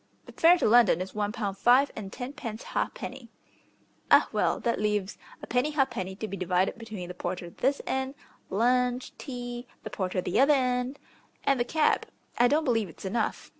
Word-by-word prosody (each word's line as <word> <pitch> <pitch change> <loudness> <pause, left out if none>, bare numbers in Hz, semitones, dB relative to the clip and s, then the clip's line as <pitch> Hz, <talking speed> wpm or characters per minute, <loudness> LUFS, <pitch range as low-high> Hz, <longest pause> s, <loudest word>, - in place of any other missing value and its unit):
"The - - -11
fare 340 +2 +5
to - - +1
London 225 -6 +5
is 185 +1 -5
one 210 -1 -1
pound 205 -4 -4
five 255 +6 +5
and 195 -3 -7
tenpence 245 -3 -6
ha'penny." 255 -3 -4 0.8
"Ah; - - +6
well, - - +1
that 235 -3 0
leaves 210 -2 -1 0.2
a - - -3
penny 250 +5 +1
ha'penny 225 -10 -1
to 215 +2 -5
be 200 - -5
divided 185 +3 0
between 215 -6 -7
the 180 - -6
porter 175 -1 -5
this 275 +8 0
end, 265 +1 -2 0.3
lunch, 250 +4 +1
tea, 245 -2 -6 0.2
the 215 - -7
porter 185 -1 -2
the 180 - 0
other 285 +2 +6
end, 250 +1 0 0.5
and 275 -2 +2
the - - +3
cab. 310 +4 +1 0.3
I 245 - +6
don't 305 +4 +2
believe 225 - +1
it's 165 - -12
enough. 215 +3 -2
235 Hz, 180 wpm, -28 LUFS, 195-260 Hz, 0.8 s, Ah